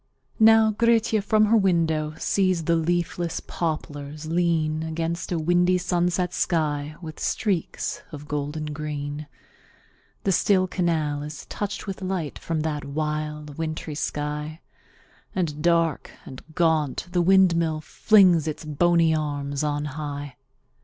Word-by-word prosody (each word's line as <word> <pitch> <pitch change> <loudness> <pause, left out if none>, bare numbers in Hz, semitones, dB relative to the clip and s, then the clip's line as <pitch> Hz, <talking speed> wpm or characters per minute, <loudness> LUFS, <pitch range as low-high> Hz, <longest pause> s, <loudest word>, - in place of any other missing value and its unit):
Now 220 0 +6
Grietje 225 0 +2
from 215 +1 +3
her 220 +2 +3
window 165 -6 +1
sees 185 -4 +1
the 170 +2 +2
leafless 170 0 -1
poplars 150 -2 -4
lean 160 -2 +1
Against 165 +2 -3
a 175 - +1
windy 175 +3 +3
sunset 180 0 0
sky 150 -3 -1
with 155 -1 -8
streaks 195 -7 -1
of 150 -1 -9
golden 150 +1 -3
green; 145 0 -5 1.0
The 195 - +2
still 185 +1 +3
canal 160 -5 0
is 150 +1 -7
touched 205 0 -4
with 195 -2 -6
light 185 -5 -3
from 165 -2 -2
that 150 -2 -2
wild, 150 0 -4
wintry 155 -1 -3
sky, 150 +2 -3 0.7
And, 155 -5 -2
dark 165 -2 +2 0.2
and 130 - -9
gaunt, 160 -3 +1
the 175 0 +2
windmill 170 -4 +4
flings 180 -3 +4
its 155 0 -4
bony 165 +2 +3
arms 145 -2 -2
on 145 0 -1
high. 145 -2 -5
160 Hz, 125 wpm, -25 LUFS, 150-175 Hz, 1.0 s, Now